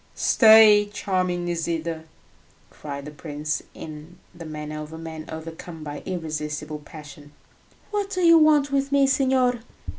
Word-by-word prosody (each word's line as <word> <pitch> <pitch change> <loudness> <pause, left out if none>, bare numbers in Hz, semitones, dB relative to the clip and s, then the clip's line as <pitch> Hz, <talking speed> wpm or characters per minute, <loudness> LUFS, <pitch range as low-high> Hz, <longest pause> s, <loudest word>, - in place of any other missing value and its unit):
"Stay, 220 -2 +6
charming 185 -3 -1
Nisida!" 165 -1 -3 0.7
cried 140 -1 -8
the 150 - -8
prince, 150 -1 -4
in 155 +2 -10 0.2
the 170 -1 -10
manner 150 0 -6
of 150 0 -9
a 160 - -8
man 160 -1 -8
overcome 160 0 -8
by 145 -1 -7
irresistible 150 -3 -4
passion. 145 -1 -13 0.6
"What 410 -1 -2
do 370 -2 -2
you 335 -1 +7
want 300 -2 +4
with 275 0 0
me, 280 -1 +4
signor?" 260 -2 +2
165 Hz, 140 wpm, -24 LUFS, 150-225 Hz, 0.7 s, you